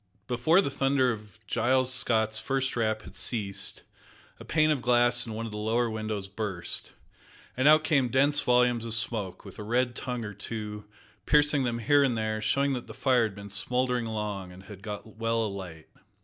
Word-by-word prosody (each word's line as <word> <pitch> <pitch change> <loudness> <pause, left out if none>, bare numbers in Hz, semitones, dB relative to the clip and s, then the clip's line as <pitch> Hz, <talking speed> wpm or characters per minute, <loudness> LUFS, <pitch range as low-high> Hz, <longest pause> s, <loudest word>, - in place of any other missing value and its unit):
Before 125 - +3
the 140 - -2
thunder 135 -2 +2
of 105 -3 -8
Giles 130 +4 +2
Scott's 110 -3 +1
first 135 +1 -1
rap 110 -2 0
had - - -12
ceased, 100 -5 -2 0.6
a - - -9
pane 155 -1 +2
of 145 -4 0
glass 120 0 +3
in 110 - -5
one 115 +1 -4
of 115 - -6
the 105 - -5
lower 115 +2 +1
windows 110 -2 -3
burst, 95 -3 -4 0.6
and 130 +3 +2
out 155 +1 +7
came 140 -6 +2
dense 140 +3 +3
volumes 125 -1 +3
of 115 -1 -1
smoke, 110 -5 -2
with 100 - -11
a - - -5
red 120 +3 +1
tongue 125 -2 -4
or 105 - -6
two 105 0 -6 0.4
piercing 145 -2 +4
them 120 -1 -1
here 145 +5 +4
and 125 -4 +1
there, 110 0 -2
showing 140 +5 +2
that 125 -2 -5
the - - -10
fire 130 -3 +3
had 110 -4 -1
been 100 0 -9
smouldering 125 +3 0
long, 105 -4 -4
and 90 +1 -13
had 100 -1 -11
got 105 +1 -8
well 115 0 +1
alight. 95 -6 -7
115 Hz, 190 wpm, -28 LUFS, 105-130 Hz, 0.6 s, out